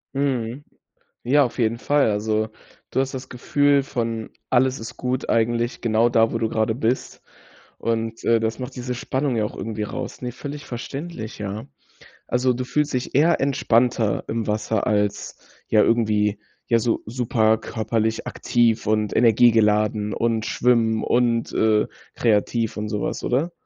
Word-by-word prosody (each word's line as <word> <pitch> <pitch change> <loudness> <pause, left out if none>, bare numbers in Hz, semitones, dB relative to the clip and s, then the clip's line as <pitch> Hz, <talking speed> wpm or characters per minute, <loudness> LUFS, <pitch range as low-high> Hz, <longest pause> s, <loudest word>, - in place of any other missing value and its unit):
Mhm. 135 -2 -1 0.6
Ja, 140 +4 +4
auf 120 - -6
jeden 115 0 +1
Fall. 145 -2 +2
Also, 110 +1 0 0.4
du - - 0
hast 135 0 -1
das 130 0 -6
Gefühl 140 +3 +2
von: 115 -4 -3 0.2
Alles 130 +1 +2
ist 115 0 -8
gut 125 +1 -2
eigentlich, 120 +1 +1
genau 115 0 +3
da, 115 -1 +3
wo 115 - -1
du 115 -1 -1
grade 110 0 0
bist 120 +1 -2 0.6
und, 115 0 -2
äh, 115 -1 +3
das 110 0 -2
macht 130 0 -7
diese 125 0 -3
Spannung 130 +1 -1
ja 110 - +1
auch 105 - -5
irgendwie 110 -1 -4
raus, 105 - -6
ne? 125 -1 -3
Völlig 145 +3 -7
verständlich, 130 -1 -6
ja. 105 +1 -5 0.6
Also, 125 +1 +2
du 125 +1 -3
fühlst 150 +3 -1
dich 125 0 -3
eher 160 +5 +4
entspannter 120 -5 +2
im 115 0 -2
Wasser 110 0 -1
als, 105 -1 0 0.3
ja, 105 -1 +4
irgendwie, 105 -3 +2 0.3
ja, 115 -1 +3
so 115 0 0
super 110 -1 +1
körperlich 110 0 -2
aktiv 115 -3 +1
und 105 -1 +1
energiegeladen 105 -2 +3
und 115 -1 0
schwimmen 115 -2 +2
und, 120 -1 +1
äh, 110 -1 +3 0.3
kreativ 115 0 +1
und 105 0 -3
so 105 -1 -3
was, - - -3
oder? 145 +8 0
115 Hz, 155 wpm, -23 LUFS, 110-125 Hz, 0.6 s, Ja